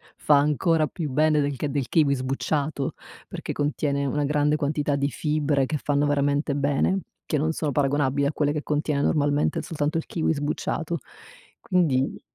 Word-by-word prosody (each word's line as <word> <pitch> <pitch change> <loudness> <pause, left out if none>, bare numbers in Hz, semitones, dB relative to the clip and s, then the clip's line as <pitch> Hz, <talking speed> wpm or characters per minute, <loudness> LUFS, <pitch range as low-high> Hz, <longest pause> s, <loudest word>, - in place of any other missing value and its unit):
fa 145 -2 +4
ancora 155 +2 +2
più 160 -6 -5
bene 155 +2 +3
del 145 -1 -1
che 145 +4 -2
del 140 -2 -2
kiwi 145 -4 +3
sbucciato? 140 +2 -2 0.3
Perché - - -6
contiene 145 -1 -1
una 145 +2 0
grande 150 +1 +2
quantità 145 -1 0
di 140 0 0
fibre, 145 0 0
che 155 - -2
fanno 145 0 0
veramente 145 0 +1
bene, 145 +7 +1 0.2
che 150 - 0
non 155 +3 +1
sono 155 -2 -2
paragonabili 140 0 +1
a 140 - 0
quelle 145 -1 +1
che 150 - -3
contiene 150 -1 0
normalmente 145 0 +1
soltanto 155 -1 -2
il 165 - -3
kiwi 160 -1 0
sbucciato, 155 +2 -2 0.6
quindi 145 -8 +1
145 Hz, 165 wpm, -25 LUFS, 140-155 Hz, 0.6 s, fa